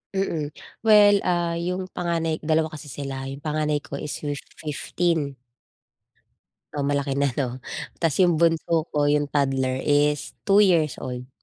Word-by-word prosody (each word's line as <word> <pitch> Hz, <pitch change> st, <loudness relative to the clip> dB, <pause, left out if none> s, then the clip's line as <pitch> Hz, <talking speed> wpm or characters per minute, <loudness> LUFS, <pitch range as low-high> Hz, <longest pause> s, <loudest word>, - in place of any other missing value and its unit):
Mm. 160 Hz, -6 st, -2 dB, 0.3 s
Well, 205 Hz, -1 st, +7 dB
ah, 170 Hz, -1 st, 0 dB
yung 180 Hz, +2 st, -3 dB
panganay 165 Hz, -2 st, -1 dB
dalawa 160 Hz, 0 st, +1 dB
kasi 150 Hz, -1 st, -9 dB
sila. 135 Hz, 0 st, -5 dB
Yung 135 Hz, +1 st, -8 dB
panganay 150 Hz, -1 st, 0 dB
ko 115 Hz, -, -6 dB
is 150 Hz, -, -4 dB
fif 145 Hz, -1 st, -2 dB, 0.2 s
15. 155 Hz, -1 st, -1 dB, 1.4 s
Oh, 145 Hz, -, -1 dB
malaki 140 Hz, -1 st, 0 dB
na 140 Hz, -1 st, +2 dB
'no. 130 Hz, 0 st, -3 dB, 0.4 s
Ta's 165 Hz, -1 st, +1 dB
yung 175 Hz, -3 st, +5 dB
bunso 165 Hz, 0 st, +2 dB
ko, 145 Hz, -1 st, +2 dB
yung 145 Hz, 0 st, +1 dB
toddler 135 Hz, -2 st, +1 dB
is 145 Hz, 0 st, +2 dB
2 200 Hz, 0 st, +5 dB
years 170 Hz, -8 st, +3 dB
old. 125 Hz, 0 st, -6 dB
150 Hz, 145 wpm, -24 LUFS, 140-170 Hz, 1.4 s, Well